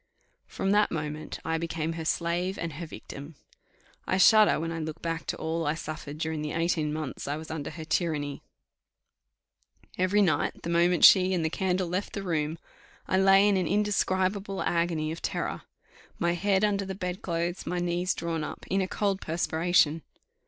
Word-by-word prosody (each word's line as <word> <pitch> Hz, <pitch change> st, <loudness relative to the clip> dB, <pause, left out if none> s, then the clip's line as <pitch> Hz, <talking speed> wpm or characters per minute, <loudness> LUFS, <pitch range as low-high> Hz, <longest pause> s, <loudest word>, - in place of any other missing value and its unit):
From 195 Hz, -, -2 dB
that 210 Hz, 0 st, +4 dB
moment 155 Hz, -1 st, -4 dB
I 160 Hz, 0 st, 0 dB
became 165 Hz, -1 st, -2 dB
her 165 Hz, -1 st, -5 dB
slave, 175 Hz, +3 st, -1 dB
and 165 Hz, -2 st, -4 dB
her 165 Hz, +3 st, -6 dB
victim. 145 Hz, 0 st, -9 dB, 0.7 s
I 185 Hz, -, +1 dB
shudder 215 Hz, +1 st, +6 dB
when 165 Hz, +1 st, -3 dB
I 165 Hz, -, -4 dB
look 155 Hz, 0 st, -5 dB
back 165 Hz, -3 st, -4 dB
to -, -, -2 dB
all 160 Hz, 0 st, -2 dB
I 150 Hz, -, +1 dB
suffered 155 Hz, -2 st, -6 dB
during 160 Hz, -1 st, -2 dB
the 150 Hz, -1 st, -3 dB
eighteen 165 Hz, -2 st, 0 dB
months 155 Hz, -3 st, -5 dB
I 145 Hz, +1 st, -1 dB
was 160 Hz, 0 st, -8 dB
under 155 Hz, -3 st, -4 dB
her 160 Hz, -2 st, -8 dB
tyranny. 150 Hz, -4 st, -1 dB, 1.6 s
Every 195 Hz, +3 st, +3 dB
night, 175 Hz, -, 0 dB
the 170 Hz, -, -3 dB
moment 170 Hz, 0 st, +5 dB
she 185 Hz, -1 st, +7 dB
and 165 Hz, -3 st, 0 dB
the 160 Hz, -, 0 dB
candle 185 Hz, -1 st, 0 dB
left 185 Hz, +4 st, -3 dB
the 200 Hz, -, -4 dB
room, 160 Hz, -3 st, -1 dB, 0.5 s
I 190 Hz, -, +2 dB
lay 195 Hz, +1 st, +6 dB
in 200 Hz, -2 st, +3 dB
an 180 Hz, -3 st, 0 dB
indescribable 195 Hz, -1 st, 0 dB
agony 170 Hz, -2 st, 0 dB
of 165 Hz, -, -6 dB
terror; -, -, -3 dB, 0.6 s
my 170 Hz, 0 st, +1 dB
head 195 Hz, +2 st, +1 dB
under 200 Hz, -1 st, +2 dB
the 190 Hz, 0 st, -5 dB
bed 180 Hz, +1 st, -4 dB
clothes, 170 Hz, 0 st, -2 dB
my 180 Hz, -, -1 dB
knees 175 Hz, +1 st, 0 dB
drawn 165 Hz, -2 st, -2 dB
up, -, -, -7 dB
in 195 Hz, +1 st, +2 dB
a 185 Hz, -, -1 dB
cold 195 Hz, 0 st, -1 dB
perspiration. 165 Hz, -1 st, +2 dB
170 Hz, 180 wpm, -28 LUFS, 160-190 Hz, 1.6 s, she